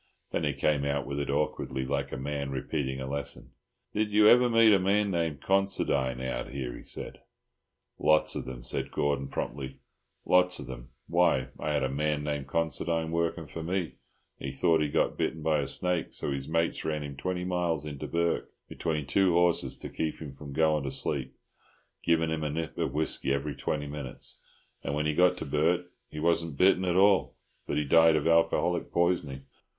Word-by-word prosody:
Then - - -1
he - - 0
came 75 -2 +1
out 70 -1 -1
with 70 +1 -3
it 70 - -3
awkwardly, 70 -2 -1
like 70 +1 -2
a - - -4
man 70 +1 -3
repeating 65 0 -3
a 65 - -4
lesson. 70 +1 -3 0.4
"Did 105 0 0
you 105 0 +5
ever 125 +2 +7
meet 115 -2 +6
a 100 - +5
man 100 +2 +2
named 80 -6 -1
Considine 90 -10 +1
out 65 -1 -3
here?" 65 -3 -5
he - - -11
said. - - -5 0.8
"Lots 75 0 +3
of - - -4
them," 60 -2 -7
said 65 - -1
Gordon 70 -2 -1
promptly—"lots 70 +7 -1
of - - -6
them. - - -9 0.2
Why, 85 -7 +2
I 75 - -1
had 75 - +1
a - - +2
man 75 +2 -1
named 75 -2 -3
Considine 80 +1 -1
working 85 0 -1
for 80 +3 -7
me, 90 +4 -1
and 80 - -10 0.5
he 70 - -4
thought 80 +4 +2
he 75 - +1
got - - 0
bitten 80 -1 -1
by 80 -1 +2
a 70 - -2
snake, 90 -2 -1
so - - -1
his 70 0 -4
mates 85 +1 0
ran 75 -1 -2
him 70 -1 -7
twenty 90 +6 -3
miles 85 -4 -1
into 70 -2 -6
Bourke 85 0 -1 0.2
between 75 -3 -2
two 90 +6 +3
horses 85 0 +2
to - - -7
keep 80 -1 -3
him 75 -4 -7
from 70 +1 -10
going 80 0 +2
to - - -1
sleep, 65 - -1 0.7
giving 80 -1 +2
him 80 -1 -2
a 75 - -1
nip 80 +2 -4
of 65 - -2
whisky 75 -3 0
every 70 +1 -1
twenty 75 +2 -2
minutes; 70 -3 -5 0.4
and 70 - -2
when 75 +1 0
he 75 - +1
got 90 +3 +4
to - - -5
Bourke 85 +5 +1 0.2
he 75 - -7
wasn't 85 -2 0
bitten 95 +1 +4
at 90 -1 +1
all, 95 -8 +4 0.3
but - - -1
he 75 - +2
died 80 +2 +6
of 75 - 0
alcoholic 85 +1 +2
poisoning. 85 -6 0
75 Hz, 195 wpm, -29 LUFS, 70-85 Hz, 0.8 s, ever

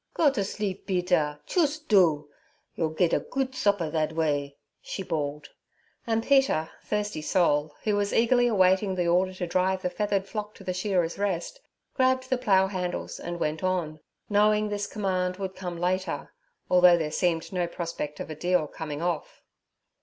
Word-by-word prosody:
'Go 300 -4 +4
t' 260 - -1
sleep, 200 -1 -4
Peder, 175 -6 +1
choost 310 -2 0
do! 165 -8 +4 0.5
Yor 160 -2 -2
ged 175 -2 +3
a - - +4
goot 265 -1 -3
supper 200 -10 +1
thad 155 0 0
way' 145 -3 -1 0.2
she 190 - -5
bawled; 150 -3 -3 0.6
and 225 0 +1
Peter, 270 - +3
thirsty 210 -6 -2
soul, 150 -4 +1
who 210 -1 +1
was 205 0 0
eagerly 245 +1 +3
awaiting 190 -2 +3
the 175 -2 0
order 180 +2 +3
to 185 -1 -4
drive 185 +2 0
the 180 - -1
feathered 200 0 -1
flock 210 0 -5
to - - -13
the 185 -1 -2
Shearers' 185 -2 0
Rest, - - -2 0.3
grabbed 260 0 +1
the 260 - +2
plough 195 -6 +4
handles 185 -2 -4
and 175 0 -5
went 155 +2 -2
on, 175 -4 -1 0.3
knowing 210 +1 +3
this 205 0 -2
command 185 -3 -1
would 190 -1 -4
come 180 -2 -5
later, 180 -4 -2 0.3
although 180 -1 +6
there 155 -2 -2
seemed 170 +1 0
no 180 -2 0
prospect 165 -4 -5
of - - -6
a - - -5
deal 175 0 +1
coming 150 +1 -6
off. 175 -3 -3
185 Hz, 170 wpm, -27 LUFS, 165-205 Hz, 0.6 s, although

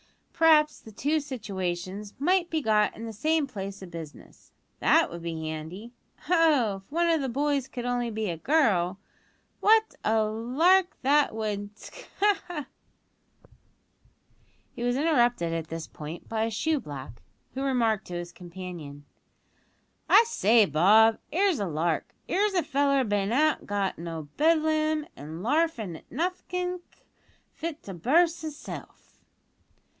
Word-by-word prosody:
"P'raps 305 -2 +4
the 220 - -12
two 290 +9 0
situations 200 -6 -5
might 350 +4 +2
be 315 -3 -1
got 210 -2 +2
in 225 - -7
the 225 - -6
same 310 +7 +1
place 195 -6 -7
o' - - -6
business; 165 -4 -11 0.3
that - - +4
would 170 0 -7
be 165 -1 -4
handy! 160 +9 -6 0.3
Oh! 300 - +3
if 195 +4 -18
one 340 +3 +1
o' 330 -1 +3
the 270 -2 -2
boys 280 +1 0
could 245 -2 -6
only 245 -1 -1
be 220 -1 -3
a 170 -3 -3
girl, 190 - +2 0.6
what 440 +1 +4
a 220 0 +2
lark 280 - +2
that 285 -2 +3
would 210 -1 -4
sk! - - -12
ha! 410 0 +3
ha!" 315 -6 -5 2.1
He - - -7
was 245 0 +1
interrupted 240 - +2
at 165 -1 -3
this 165 0 -5
point 155 +3 -9
by 220 0 -1
a - - -1
shoe 300 +8 0
black, 135 - -9 0.3
who 265 - -4
remarked 235 -6 +1
to 175 - -6
his 175 0 -5
companion: 175 -5 -9 1.0
"I - - +8
say, 230 - +4
Bob, 210 +8 +5
'ere's 370 -2 +2
a 200 - -1
lark. 160 +1 -2
'Ere's 400 +2 +1
a 355 - +2
feller 275 -1 +2
bin 205 -2 0
an 305 +5 +2
got 200 -3 -2
out 170 - -6
o' 160 -3 -6
Bedlam, 310 -1 +2
a 145 - -10
larfin' 220 - -1
at - - -20
nothink 360 +3 -3 0.7
fit 320 -1 -6
to 195 - -7
burst 325 - +2
hisself!" 310 -2 -9
230 Hz, 150 wpm, -27 LUFS, 185-310 Hz, 2.1 s, I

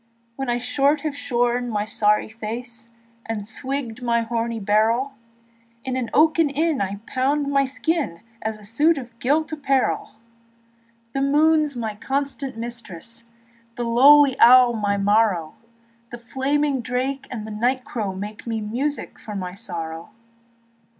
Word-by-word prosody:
When 270 -1 -4
I 240 - +1
short 280 +4 +1
have 300 -2 -3
shorn 245 -2 0
my 210 -2 -1
sow's 210 0 +1
face 230 +1 -7 0.4
And 220 -3 -3
swigged 250 0 -4
my 235 -1 +1
horny 230 0 -2
barrel, 220 +6 +2 0.7
In 260 -1 -3
an 250 -3 -2
oaken 315 +1 +4
inn 305 0 0
I 200 +1 -3
pound 280 +3 0
my 275 -1 +3
skin 280 - -2 0.2
As 220 0 -3
a 210 - -16
suit 295 +10 +3
of 240 -3 -9
gilt 305 +5 +1
apparel; 275 -4 0 1.0
The 275 - -1
moon's 300 +1 +3
my 225 -3 -3
constant 270 +2 -3
mistress, 230 -2 -7
And 230 0 -33
the 240 - -2
lowly 270 +4 +6
owl 250 0 +8
my 205 -2 0
marrow; 200 -5 +2 0.6
The 240 - -7
flaming 270 +3 0
drake 255 +3 -2
and 220 -4 -5
the 220 - -7
night 250 +5 0
crow 215 -8 -3
make 205 +4 -7
Me 225 -1 -1
music 250 +8 -3
to 210 - -5
my 180 -2 -4
sorrow. 170 -6 -6
240 Hz, 145 wpm, -23 LUFS, 220-275 Hz, 1.0 s, owl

